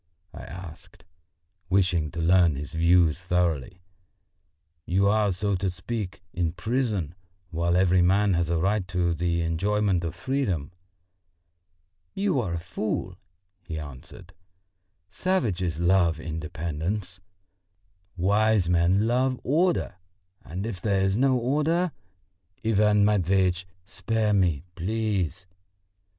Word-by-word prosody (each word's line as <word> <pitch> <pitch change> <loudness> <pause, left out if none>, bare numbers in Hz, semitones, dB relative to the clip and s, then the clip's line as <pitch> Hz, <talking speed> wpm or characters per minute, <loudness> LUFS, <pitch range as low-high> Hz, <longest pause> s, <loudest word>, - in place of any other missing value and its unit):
I - - -9
asked, 85 -1 -11 0.6
wishing 90 -5 +2
to 85 - -7
learn 85 -2 +4
his 70 +1 -7
views 85 -1 +3
thoroughly. 90 -2 -1 1.0
"You 95 +3 +2
are, 105 -1 +3
so 100 +3 -1
to 95 +1 -1
speak, 95 +2 -5
in 85 -2 -1
prison, 110 - -1 0.4
while 85 +1 0
every 90 -1 +4
man 100 +3 +3
has 85 -1 0
a 85 - +1
right 95 +3 0
to 90 -1 0
the 85 0 -1
enjoyment 95 +2 0
of 85 0 -4
freedom." 90 - -2 1.4
"You 195 -7 +1
are 90 -6 -3
a - - -2
fool," 90 +2 -3 0.5
he 80 -3 -6
answered. 75 +5 -10 0.7
"Savages 100 - -1
love 85 -2 +3
independence, 80 +4 -4 1.0
wise 100 +1 +2
men 90 +4 +3
love 125 +2 +1
order; 165 - +1 0.5
and 90 +5 -5
if 100 -6 -5
there 100 -2 +1
is 95 0 +1
no 130 +2 +3
order...." 150 +8 +1 0.7
"Ivan 105 -1 +4
Matveitch, 95 -2 +1 0.2
spare 110 -1 -1
me, 85 -7 +2
please!" 95 -2 -2
90 Hz, 115 wpm, -26 LUFS, 85-105 Hz, 1.4 s, learn